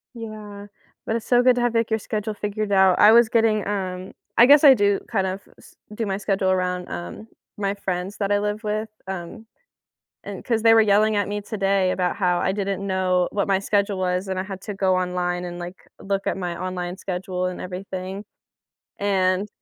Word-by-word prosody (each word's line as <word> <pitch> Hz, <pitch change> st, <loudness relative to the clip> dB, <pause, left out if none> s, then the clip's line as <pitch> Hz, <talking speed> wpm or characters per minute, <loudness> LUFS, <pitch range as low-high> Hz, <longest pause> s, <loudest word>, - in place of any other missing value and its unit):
Yeah. 210 Hz, -3 st, -8 dB, 0.4 s
But 225 Hz, -, -1 dB
it's 225 Hz, -, -8 dB
so 245 Hz, -1 st, +4 dB
good 250 Hz, -1 st, +5 dB
to 245 Hz, -, -1 dB
have, 240 Hz, -1 st, 0 dB
like, 230 Hz, 0 st, +1 dB
your 220 Hz, 0 st, 0 dB
schedule 210 Hz, +1 st, -3 dB
figured 210 Hz, 0 st, -3 dB
out. 190 Hz, -2 st, +5 dB
I 210 Hz, -, +8 dB
was 235 Hz, 0 st, +6 dB
getting, 225 Hz, -2 st, +2 dB
um, 185 Hz, -2 st, -4 dB, 0.2 s
I 235 Hz, -, +8 dB
guess 290 Hz, +3 st, +7 dB
I 275 Hz, -2 st, +10 dB
do 205 Hz, -3 st, +2 dB
kind 195 Hz, -4 st, +1 dB
of 190 Hz, +1 st, -4 dB, 0.2 s
s -, -, -18 dB, 0.2 s
do 225 Hz, +1 st, -3 dB
my 195 Hz, -1 st, -2 dB
schedule 195 Hz, -2 st, 0 dB
around, 180 Hz, -1 st, -1 dB
um, 85 Hz, -, -7 dB, 0.3 s
my 200 Hz, -1 st, -1 dB
friends 190 Hz, 0 st, -4 dB
that 200 Hz, -1 st, -1 dB
I 205 Hz, -, +3 dB
live 210 Hz, +2 st, -3 dB
with, 215 Hz, +1 st, -2 dB, 0.2 s
um, 190 Hz, +4 st, -7 dB, 0.8 s
and -, -, -7 dB
'cause 230 Hz, -3 st, 0 dB
they 225 Hz, 0 st, +7 dB
were 225 Hz, -, +6 dB
yelling 215 Hz, +1 st, +3 dB
at 205 Hz, -1 st, 0 dB
me 205 Hz, -, -2 dB
today 195 Hz, -3 st, 0 dB
about 180 Hz, +1 st, -1 dB
how 180 Hz, -3 st, +1 dB
I 190 Hz, -, +1 dB
didn't 195 Hz, 0 st, -3 dB
know 185 Hz, -2 st, +1 dB
what 200 Hz, -1 st, -1 dB
my 195 Hz, -1 st, +2 dB
schedule 200 Hz, 0 st, 0 dB
was, 185 Hz, +1 st, -1 dB
and 190 Hz, -1 st, -3 dB
I 185 Hz, -, -1 dB
had 190 Hz, -1 st, -7 dB
to 205 Hz, -, -5 dB
go 190 Hz, -1 st, +1 dB
online 180 Hz, -1 st, -2 dB
and, 175 Hz, 0 st, -7 dB
like, 175 Hz, +2 st, -9 dB
look 195 Hz, 0 st, -2 dB
at -, -, 0 dB
my 175 Hz, -2 st, -4 dB
online 180 Hz, 0 st, -4 dB
schedule 185 Hz, -1 st, -4 dB
and 180 Hz, 0 st, -4 dB
everything 185 Hz, +2 st, -6 dB, 0.7 s
and 190 Hz, 0 st, +1 dB
195 Hz, 210 wpm, -23 LUFS, 185-210 Hz, 0.8 s, I